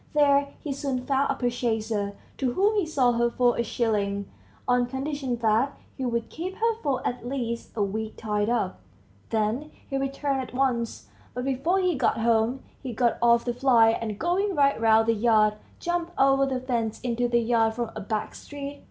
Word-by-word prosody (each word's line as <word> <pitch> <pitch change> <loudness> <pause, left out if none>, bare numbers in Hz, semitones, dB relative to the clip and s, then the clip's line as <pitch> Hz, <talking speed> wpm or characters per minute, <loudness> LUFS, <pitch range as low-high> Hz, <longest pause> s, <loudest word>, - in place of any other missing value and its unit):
There 280 -1 +3
he 290 - -2
soon 265 -2 -3
found 275 0 +1
a - - -1
purchaser, 220 -4 -1 0.2
to 255 -3 0
whom 405 - +3
he 400 -6 +1
sold 250 -6 +2
her 235 0 +3
for 245 0 +2
a - - 0
shilling, 200 -4 -1 0.4
on 245 -1 +3
condition 265 0 -3
that 225 +6 +2 0.2
he 265 - -3
would 235 -1 -1
keep 365 +4 -5
her 460 +1 +1
for 275 -3 -1
at 245 - -4
least 240 -2 -4
a 210 - +1
week 215 +2 -3
tied 210 -1 -1
up; 215 -6 -1 0.5
then 225 +7 -1 0.2
he 275 - -2
returned 275 0 -1
at 255 - -8
once. 235 - -1 0.3
But 250 +1 -3
before 275 +8 +1
he 365 -1 +2
got 255 -5 +1
home, 230 +3 +1 0.2
he 255 -3 -5
got 235 +1 +1
off 235 0 +4
the 240 - 0
fly, 245 -3 +5
and 225 -2 -3
going 370 - 0
right 280 -4 +3
round 225 0 +5
the 230 - +4
yard, 215 -1 +3 0.2
jumped 345 0 -2
over 275 0 +4
the 260 -1 -1
fence 235 -4 -2
into 245 0 0
the 240 0 +2
yard 225 -1 +2
from 235 -1 -3
a 215 - -5
back 210 +1 -3
street. 285 0 -8
245 Hz, 190 wpm, -26 LUFS, 225-275 Hz, 0.5 s, fly